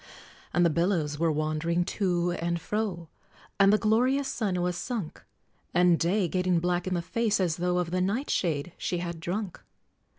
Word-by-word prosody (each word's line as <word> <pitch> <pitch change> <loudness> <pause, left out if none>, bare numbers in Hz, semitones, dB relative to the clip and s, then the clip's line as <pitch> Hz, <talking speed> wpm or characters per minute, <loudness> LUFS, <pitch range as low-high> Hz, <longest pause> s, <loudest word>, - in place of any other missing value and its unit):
And 175 +1 +3
the 170 - +4
billows 165 -3 0
were 165 -1 +2
wandering 155 +3 0
to 175 -3 0
and 170 0 -2
fro, 195 -4 -3 0.5
And 195 0 +6
the 210 - +5
glorious 250 +6 +2
sun 200 -8 -1
was 180 0 0
sunk, 205 -2 -5 0.5
And 175 -1 +5
Day, 185 +3 +1
getting 180 0 +1
black 175 +1 -1
in 185 - 0
the 170 - -2
face, 220 +2 0
as 175 -4 0
though 180 +1 0
Of 175 -2 -1
the 185 0 0
nightshade 180 - -1
she 180 - -1
had 170 -1 -4
drunk! 185 +3 -4
180 Hz, 170 wpm, -28 LUFS, 170-195 Hz, 0.5 s, And